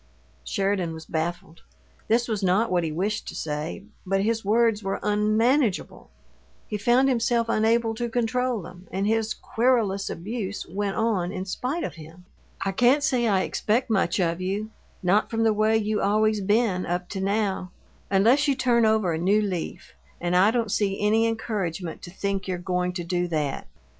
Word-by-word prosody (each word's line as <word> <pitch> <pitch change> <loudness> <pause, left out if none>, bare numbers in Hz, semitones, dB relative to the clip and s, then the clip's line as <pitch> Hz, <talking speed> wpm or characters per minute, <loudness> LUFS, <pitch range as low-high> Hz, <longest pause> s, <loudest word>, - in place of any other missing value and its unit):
Sheridan 190 - -1
was 160 - -9
baffled. 165 0 -4 0.5
This 235 +2 +2
was 215 -3 -2
not 195 +4 +2
what 175 -1 +2
he 160 - -2
wished 200 +7 -2
to - - -6
say, 150 +5 -4 0.2
but 195 +1 0
his 225 +1 0
words 225 +1 +2
were 195 -1 -2
unmanageable; 215 +3 +1 0.6
he 215 - -4
found 240 +6 +4
himself 235 -2 +1
unable 225 +1 +2
to 235 +1 -3
control 245 -1 0
them, 180 +2 -12
and 195 +1 -1
his 220 0 0
querulous 225 -5 +1
abuse 200 +2 -4
went 200 +2 -2
on 205 -6 0
in 185 -1 -4
spite 260 - -3
of - - -4
him. 165 +4 -14 0.4
"I 195 - +1
can't 250 +8 +3
say 245 -4 +2
I 195 -3 +3
expect 230 +5 0
much 200 -1 +1
of 170 0 0
you 200 +4 -3 0.3
not 195 +4 +2
from 225 0 0
the 220 -1 +4
way 215 +1 +3
you 215 -1 -1
always 215 +1 +2
been, 205 -2 +1
up 175 +1 -2
to 195 - -4
now 195 -2 -1 0.4
unless 225 +10 +4
you 280 - +3
turn 240 -3 +3
over 215 -6 +2
a 160 - -2
new 195 +5 +3
leaf, 185 -5 -4 0.3
and 175 0 -1
I 190 +3 +6
don't 230 -2 0
see 195 -2 0
any 220 +2 +3
encouragement 195 -7 -3
to - - -9
think 195 +1 -3
you're 185 -1 -2
goin' 180 0 -1
to 175 -1 -4
do 175 +1 -1
THAT! 150 -4 -2
205 Hz, 180 wpm, -25 LUFS, 185-225 Hz, 0.6 s, I